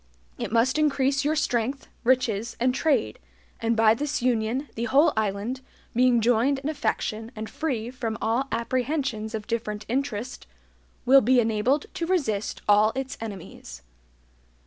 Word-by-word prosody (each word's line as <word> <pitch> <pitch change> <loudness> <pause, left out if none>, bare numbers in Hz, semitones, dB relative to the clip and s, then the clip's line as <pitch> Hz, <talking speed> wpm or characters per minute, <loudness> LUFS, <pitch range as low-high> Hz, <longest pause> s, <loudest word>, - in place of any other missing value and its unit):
It - - -4
must 240 +6 +2
increase 275 -2 +2
your 300 +2 +1
strength, 260 -2 -1 0.2
riches, 235 -3 +1
and 250 +1 +2
trade; 270 - 0 0.4
and 230 0 0
by 220 -1 +6
this 295 +5 -2
union 245 +3 0
the 230 - -3
whole 275 +7 +4
island, 220 +4 -2 0.3
being 245 -1 +4
joined 245 +4 +3
in 275 +2 -4
affection 225 -6 -2
and 220 0 -5
free 245 -6 -3
from 235 -4 -4
all 235 +5 0
apprehensions 240 -2 -2
of 215 -1 -5
different 215 -2 -3
interest, 250 - -3 0.6
will 270 +2 +7
be 250 +3 +4
ENABLED 230 +5 +1
TO 335 - -3
RESIST 225 - -1
ALL 210 +1 +5
ITS 265 +1 -4
ENEMIES." 185 - -8
240 Hz, 145 wpm, -25 LUFS, 220-270 Hz, 0.6 s, will